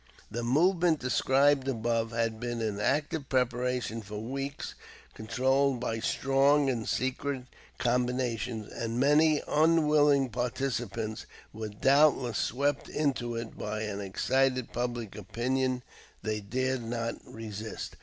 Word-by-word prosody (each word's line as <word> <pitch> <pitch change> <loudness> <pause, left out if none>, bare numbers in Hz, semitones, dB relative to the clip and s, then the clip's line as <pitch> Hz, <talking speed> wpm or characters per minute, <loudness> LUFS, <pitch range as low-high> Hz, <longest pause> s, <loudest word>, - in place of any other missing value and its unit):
The 120 - -3
movement 165 +7 +3
described 135 +1 +3
above 115 -2 0
had 115 -1 -1
been 120 0 -3
in 105 -3 -2
active 145 +5 0
preparation 125 -2 0
for 105 0 -7
weeks, 135 +5 -4 0.4
controlled 130 +4 +1
by 115 -2 -2
strong 135 +3 +3
and 115 -3 -3
secret 130 +1 -1 0.3
combinations, 120 -3 -1
and 115 +1 -3
many 150 +2 +4
unwilling 150 -3 +4
participants 120 -2 -3 0.3
were 110 0 -5
doubtless 135 +1 +3
swept 140 +3 0
into 130 -6 -1
it 115 0 -5
by 105 +1 -4
an 100 -2 -4
excited 130 +6 0
public 120 -4 -3
opinion 125 +5 -1 0.4
they 110 0 -1
dared 130 +5 -1
not 115 0 -2
resist. 110 -1 -7
125 Hz, 115 wpm, -29 LUFS, 115-135 Hz, 0.4 s, many